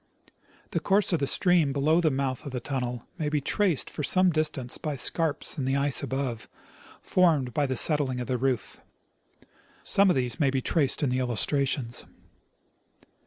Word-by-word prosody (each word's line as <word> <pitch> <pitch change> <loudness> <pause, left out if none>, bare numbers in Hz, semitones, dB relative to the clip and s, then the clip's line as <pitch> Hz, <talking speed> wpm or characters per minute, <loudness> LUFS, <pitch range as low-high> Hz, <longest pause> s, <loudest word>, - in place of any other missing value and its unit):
The - - 0
course 195 -1 +1
of 170 - +2
the 140 - -1
stream 175 -4 +2
below 155 +5 +2
the 160 - +3
mouth 130 -2 -2
of - - -6
the 125 - -3
tunnel 125 -2 -4
may 150 -2 -1
be 150 0 0
traced 175 +2 0
for - - -6
some 185 +5 +3
distance 150 -5 -2
by 150 -2 -3
scarps 155 +3 -1
in 130 - -2
the 135 +1 0
ice 140 0 +1
above, 130 -4 -4 0.5
formed 155 -9 +2
by 145 -1 0
the 130 -1 -1
settling 140 -4 +3
of 125 - -3
the 125 -1 -2
roof. 125 -6 -2 1.0
Some 200 0 +4
of 180 - +3
these 125 -3 -2
may 145 -4 +3
be 135 0 0
traced 145 +2 0
in 140 - +1
the 130 - 0
illustrations. 130 +1 0
140 Hz, 175 wpm, -27 LUFS, 130-155 Hz, 1.0 s, Some